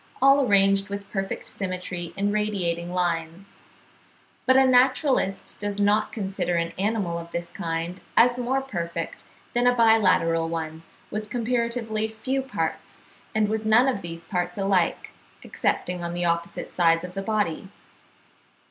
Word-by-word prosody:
all 275 Hz, +1 st, +6 dB
arranged 195 Hz, -3 st, +3 dB
with 200 Hz, 0 st, -6 dB
perfect 195 Hz, -1 st, -3 dB
symmetry 180 Hz, -2 st, -4 dB
in 200 Hz, +1 st, +1 dB
radiating 180 Hz, -5 st, -1 dB
lines; 175 Hz, +1 st, -3 dB, 0.9 s
but 260 Hz, 0 st, +6 dB
a 265 Hz, -, +6 dB
naturalist 255 Hz, -5 st, +2 dB
does 205 Hz, 0 st, -3 dB
not 205 Hz, +1 st, +2 dB
consider 190 Hz, -4 st, -2 dB
an 170 Hz, 0 st, -1 dB
animal 195 Hz, -5 st, 0 dB
of 170 Hz, 0 st, -9 dB
this 170 Hz, 0 st, -5 dB
kind 170 Hz, -1 st, -4 dB, 0.2 s
as 245 Hz, +1 st, +5 dB
more 260 Hz, +2 st, 0 dB
perfect 170 Hz, -9 st, -5 dB, 0.3 s
than 245 Hz, +1 st, +2 dB
a 245 Hz, -, +4 dB
bilateral 190 Hz, -8 st, +4 dB
one 160 Hz, -1 st, -4 dB, 0.3 s
with 215 Hz, 0 st, -4 dB
comparatively 235 Hz, -2 st, -1 dB
few 240 Hz, +5 st, -2 dB
parts, 265 Hz, -, -4 dB, 0.3 s
and 215 Hz, -1 st, +3 dB
with 220 Hz, +1 st, -2 dB
none 220 Hz, +4 st, +5 dB
of 250 Hz, -7 st, 0 dB
these 165 Hz, -1 st, -8 dB
parts 180 Hz, -1 st, -2 dB
alike, 195 Hz, -3 st, 0 dB, 0.3 s
excepting 180 Hz, -1 st, -2 dB
on 170 Hz, 0 st, -3 dB
the 175 Hz, 0 st, 0 dB
opposite 170 Hz, 0 st, -2 dB
sides 165 Hz, -1 st, +3 dB
of 180 Hz, 0 st, -7 dB
the 195 Hz, -, -3 dB
body. 195 Hz, -4 st, -1 dB
195 Hz, 145 wpm, -25 LUFS, 170-220 Hz, 0.9 s, all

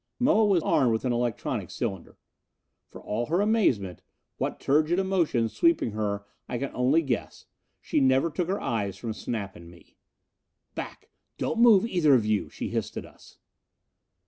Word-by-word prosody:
Moa 245 Hz, -4 st, +4 dB
was 190 Hz, -6 st, +2 dB
armed 130 Hz, -5 st, +3 dB
with 110 Hz, -, -2 dB
an 125 Hz, -, +1 dB
electronic 120 Hz, -1 st, -2 dB
cylinder. 95 Hz, -3 st, -5 dB, 0.7 s
For -, -, -11 dB
all 115 Hz, +3 st, -3 dB
her 170 Hz, +4 st, +1 dB
amazement 135 Hz, -, +1 dB, 0.4 s
what -, -, -3 dB
turgid 155 Hz, +5 st, +2 dB
emotions 175 Hz, -12 st, +1 dB
sweeping 335 Hz, -, +2 dB
her 100 Hz, -1 st, -3 dB, 0.2 s
I 120 Hz, -, -2 dB
can 140 Hz, +2 st, -3 dB
only 135 Hz, +7 st, +2 dB
guess 130 Hz, -5 st, -4 dB, 0.3 s
she -, -, -1 dB
never 135 Hz, +4 st, +3 dB
took 170 Hz, +3 st, -2 dB
her 195 Hz, +2 st, -1 dB
eyes 105 Hz, -6 st, -2 dB
from 115 Hz, -2 st, -4 dB
Snap 105 Hz, -3 st, -5 dB
and 85 Hz, -3 st, -12 dB
me. 85 Hz, 0 st, -19 dB, 0.8 s
"Back! -, -, -8 dB, 0.3 s
Don't 230 Hz, -, -2 dB
move, 230 Hz, -4 st, +6 dB
either 170 Hz, -, +3 dB
of 115 Hz, -4 st, +2 dB
you!" 105 Hz, -2 st, 0 dB
She -, -, -5 dB
hissed -, -, -3 dB
it -, -, -5 dB
at -, -, -16 dB
us. -, -, -19 dB
130 Hz, 170 wpm, -27 LUFS, 110-180 Hz, 0.8 s, move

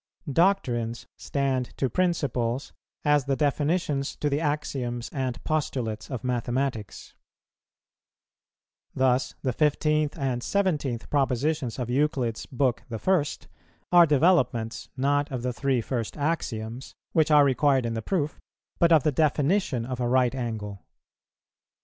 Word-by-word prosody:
Doctrines 125 Hz, -, +1 dB
stand 135 Hz, -3 st, -2 dB
to 135 Hz, -, +1 dB
principles, 135 Hz, -7 st, -1 dB, 0.3 s
as 145 Hz, -2 st, +3 dB
the 140 Hz, -1 st, +1 dB
definitions 145 Hz, 0 st, 0 dB
to 145 Hz, -, -1 dB
the 140 Hz, -, +1 dB
axioms 130 Hz, -6 st, -2 dB
and 130 Hz, -3 st, -3 dB
postulates 125 Hz, -8 st, -2 dB
of 125 Hz, -5 st, -5 dB
mathematics. 125 Hz, -2 st, -2 dB, 1.8 s
Thus 130 Hz, 0 st, +1 dB
the 130 Hz, -, 0 dB
15th 150 Hz, +2 st, +1 dB
and 130 Hz, -4 st, -1 dB
17th 150 Hz, -, -1 dB
propositions 140 Hz, -1 st, 0 dB
of 125 Hz, -2 st, -3 dB
Euclid's 130 Hz, -4 st, 0 dB
book 130 Hz, -2 st, 0 dB
I. 150 Hz, -, +2 dB, 0.7 s
are 175 Hz, -1 st, +7 dB
developments, 130 Hz, -7 st, +2 dB
not 145 Hz, +2 st, +1 dB
of 125 Hz, -2 st, -4 dB
the 125 Hz, 0 st, -1 dB
three 130 Hz, -1 st, 0 dB
first 115 Hz, +1 st, -3 dB
axioms, 130 Hz, -6 st, -3 dB, 0.2 s
which 160 Hz, -1 st, +3 dB
are 150 Hz, -2 st, +6 dB
required 135 Hz, -1 st, +2 dB
in 115 Hz, -, -2 dB
the 115 Hz, -, -3 dB
proof, 155 Hz, -, -2 dB, 0.4 s
but 170 Hz, 0 st, +4 dB
of 155 Hz, -5 st, +6 dB
the 150 Hz, -, +2 dB
definition 145 Hz, -, +1 dB
of 125 Hz, 0 st, -5 dB
a 120 Hz, -, 0 dB
right 125 Hz, -1 st, +3 dB
angle. 110 Hz, -6 st, -5 dB
135 Hz, 125 wpm, -26 LUFS, 120-150 Hz, 1.8 s, are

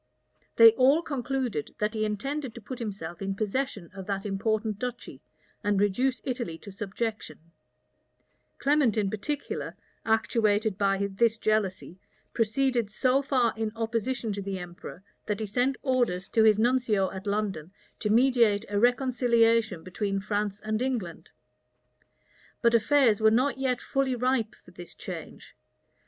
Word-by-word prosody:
[*] -, -, -41 dB
They 230 Hz, -1 st, +9 dB
all 270 Hz, +7 st, +4 dB
concluded, 260 Hz, -, -3 dB
that 210 Hz, +1 st, -1 dB
he 215 Hz, -1 st, 0 dB
intended 260 Hz, +5 st, -3 dB
to 235 Hz, -, -9 dB
put 250 Hz, +4 st, -7 dB
himself 200 Hz, -6 st, -6 dB
in 195 Hz, 0 st, -2 dB
possession 215 Hz, -3 st, -3 dB
of 190 Hz, -2 st, -9 dB
that 195 Hz, 0 st, -3 dB
important 215 Hz, +1 st, -1 dB
duchy, 250 Hz, 0 st, -6 dB, 0.4 s
and 205 Hz, -2 st, +1 dB
reduce 245 Hz, +6 st, +1 dB
Italy 240 Hz, -11 st, -3 dB
to 200 Hz, -, -11 dB
subjection: 210 Hz, +3 st, -4 dB, 1.2 s
Clement 280 Hz, -6 st, +2 dB
in 200 Hz, -2 st, +1 dB
particular, 285 Hz, +7 st, -4 dB, 0.3 s
actuated 220 Hz, -2 st, +1 dB
by 200 Hz, 0 st, +1 dB
this 225 Hz, +3 st, +2 dB
jealousy, 200 Hz, -4 st, -1 dB, 0.3 s
proceeded 235 Hz, 0 st, +1 dB
so 255 Hz, +5 st, +2 dB
far 255 Hz, -4 st, +1 dB
in 220 Hz, -1 st, -2 dB
opposition 230 Hz, 0 st, -2 dB
to 200 Hz, -, -4 dB
the 195 Hz, -1 st, -4 dB
emperor, 175 Hz, +1 st, -9 dB, 0.2 s
that 210 Hz, -1 st, -1 dB
he 220 Hz, -, -2 dB
sent 245 Hz, +6 st, 0 dB
orders 240 Hz, -9 st, 0 dB
to 225 Hz, -, +2 dB
his 215 Hz, -1 st, +5 dB
nuncio 225 Hz, -4 st, +2 dB
at 190 Hz, +2 st, -8 dB
London 200 Hz, -5 st, -2 dB, 0.3 s
to 210 Hz, -, -1 dB
mediate 230 Hz, -3 st, +3 dB
a 205 Hz, 0 st, 0 dB
reconciliation 235 Hz, -5 st, +2 dB
between 195 Hz, +2 st, -2 dB
France 205 Hz, 0 st, -2 dB
and 215 Hz, +1 st, -2 dB
England. 205 Hz, -11 st, -3 dB, 1.3 s
But 235 Hz, 0 st, +4 dB
affairs 235 Hz, -1 st, +4 dB
were 220 Hz, -, +6 dB
not 260 Hz, +5 st, +1 dB
yet 255 Hz, -2 st, 0 dB
fully 270 Hz, -2 st, -1 dB
ripe 245 Hz, -2 st, 0 dB
for -, -, -19 dB
this 175 Hz, -1 st, -11 dB
change. -, -, -9 dB
220 Hz, 145 wpm, -27 LUFS, 200-250 Hz, 1.3 s, They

